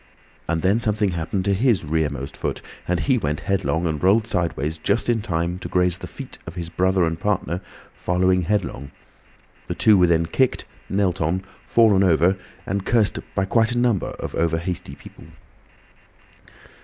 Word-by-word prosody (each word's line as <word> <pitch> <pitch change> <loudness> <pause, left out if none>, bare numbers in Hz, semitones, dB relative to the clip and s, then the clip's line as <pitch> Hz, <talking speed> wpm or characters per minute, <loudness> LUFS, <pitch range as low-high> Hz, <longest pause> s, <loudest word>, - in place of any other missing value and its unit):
And 85 -1 -1
then 100 +5 +3
something 105 -2 +1
happened 85 +3 -2
to 100 - +2
his 110 -1 +2
rear 80 0 +1
most 70 -1 -6
foot, - - -4 0.2
and 90 -1 0
he 130 -3 +2
went 75 -5 -2
headlong 90 -3 0
and 80 -3 -2
rolled 105 +4 +4
sideways 80 -6 -2
just 100 +9 0
in 115 -2 +2
time 85 -1 -2
to - - -6
graze 90 -1 +1
the - - -7
feet - - -10
of 85 - -7
his 85 -2 -5
brother 95 +2 +2
and 80 0 -1
partner, 90 -4 -1 0.3
following 90 +1 +1
headlong. 85 -7 -2 0.8
The - - -3
two 105 -3 +5
were 90 - +5
then 85 -1 +3
kicked, 130 +9 0 0.2
knelt 95 -3 0
on, 85 +5 0 0.2
fallen 110 -4 +4
over, 90 0 +4 0.3
and 100 +1 -2
cursed 110 -3 +2 0.2
by 95 - +1
quite 115 +3 +2
a - - -2
number 120 -5 +2
of - - -6
over 80 0 +1
hasty 85 +1 -5
people. - - -14
90 Hz, 175 wpm, -22 LUFS, 85-100 Hz, 0.8 s, two